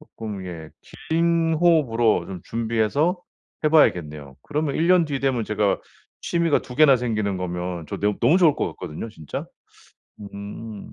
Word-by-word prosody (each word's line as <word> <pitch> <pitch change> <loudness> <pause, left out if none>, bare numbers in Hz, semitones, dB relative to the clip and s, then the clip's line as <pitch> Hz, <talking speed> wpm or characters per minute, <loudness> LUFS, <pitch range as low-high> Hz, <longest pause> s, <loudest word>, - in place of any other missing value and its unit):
쪼끔 105 -10 -8
예 80 -3 -8 0.4
긴 165 0 +2
호흡으로 145 -10 +3
좀 95 -3 -7
준비해서 115 - 0 0.4
해 - - +5
봐야겠네요. 75 - +2
그러면 150 -1 -2
1 165 +2 +1
년 180 -2 +5
뒤 140 -2 -3
되면 130 -5 0
제가 105 -1 0 0.4
취미가 170 -3 +1
2 125 - -10
개나 145 -4 +6
생기는 110 -5 -1
거면 90 -2 -4
저 - - -5
너 105 0 +1
너무 150 +11 +5
좋을 165 -5 +4
것 - - 0
같거든요 75 +9 -7
진짜. 80 -8 -7 0.9
음. 105 +1 -8
115 Hz, 285 characters per minute, -23 LUFS, 100-155 Hz, 0.9 s, 개나